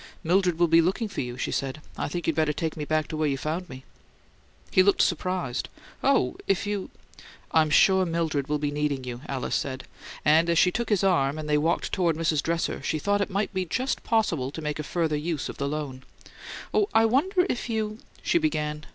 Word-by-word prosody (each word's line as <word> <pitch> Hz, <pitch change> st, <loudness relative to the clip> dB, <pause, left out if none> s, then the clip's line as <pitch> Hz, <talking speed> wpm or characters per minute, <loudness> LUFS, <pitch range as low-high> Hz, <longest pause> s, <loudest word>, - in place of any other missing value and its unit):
"Mildred 180 Hz, 0 st, +2 dB
will 175 Hz, 0 st, +4 dB
be 165 Hz, +1 st, +6 dB
looking 190 Hz, +7 st, 0 dB
for 200 Hz, -, -4 dB
you," 125 Hz, -1 st, -5 dB
she -, -, -2 dB
said. 135 Hz, +2 st, -2 dB, 0.2 s
"I -, -, -2 dB
think 175 Hz, +3 st, -4 dB
you'd 165 Hz, -, +1 dB
better 155 Hz, -2 st, +2 dB
take 160 Hz, +1 st, -3 dB
me 150 Hz, -, -4 dB
back 155 Hz, 0 st, 0 dB
to -, -, -4 dB
where 155 Hz, 0 st, +1 dB
you 135 Hz, -1 st, 0 dB
found 160 Hz, +5 st, -3 dB
me." 130 Hz, 0 st, -9 dB, 0.9 s
He 185 Hz, -, +6 dB
looked 200 Hz, +1 st, +4 dB
surprised. 175 Hz, -6 st, -1 dB, 0.3 s
"Oh, 125 Hz, -, +2 dB
if 195 Hz, +1 st, +1 dB
you 205 Hz, -2 st, -3 dB, 0.3 s
" -, -, -21 dB
"I'm 160 Hz, -1 st, +4 dB
sure 190 Hz, +5 st, +5 dB
Mildred 165 Hz, -5 st, -1 dB
will 150 Hz, 0 st, 0 dB
be 145 Hz, 0 st, -2 dB
needing 145 Hz, -2 st, -1 dB
you," 125 Hz, -1 st, -6 dB
Alice 135 Hz, -2 st, -2 dB
said, 130 Hz, -2 st, -3 dB, 0.4 s
and 160 Hz, +3 st, +5 dB
as 170 Hz, -, +2 dB
she 180 Hz, -, +5 dB
took 235 Hz, +4 st, -2 dB
his 205 Hz, -3 st, +2 dB
arm 155 Hz, -7 st, +2 dB
and 155 Hz, -1 st, -5 dB
they 150 Hz, -, +2 dB
walked 165 Hz, +3 st, 0 dB
toward 175 Hz, -4 st, +1 dB
Mrs. 160 Hz, -2 st, +1 dB
Dresser, 165 Hz, +1 st, -1 dB
she 155 Hz, -, -1 dB
thought 205 Hz, +6 st, +1 dB
it 200 Hz, -, -1 dB
might 200 Hz, +2 st, -1 dB
be 185 Hz, -1 st, 0 dB
just 255 Hz, +10 st, -2 dB
possible 170 Hz, -, +1 dB
to 145 Hz, -, -7 dB
make 150 Hz, -1 st, -3 dB
a -, -, -2 dB
further 160 Hz, -1 st, -1 dB
use 150 Hz, -1 st, -2 dB
of -, -, -7 dB
the 140 Hz, -, -1 dB
loan. 140 Hz, -3 st, -4 dB, 0.7 s
"Oh, 415 Hz, -1 st, +2 dB
I 225 Hz, -, +6 dB
wonder 360 Hz, -, +2 dB
if 245 Hz, -6 st, -3 dB
you 215 Hz, -1 st, -2 dB
" -, -, -27 dB
she 345 Hz, -, +3 dB
began. 150 Hz, -, -2 dB
160 Hz, 225 wpm, -26 LUFS, 150-190 Hz, 0.9 s, be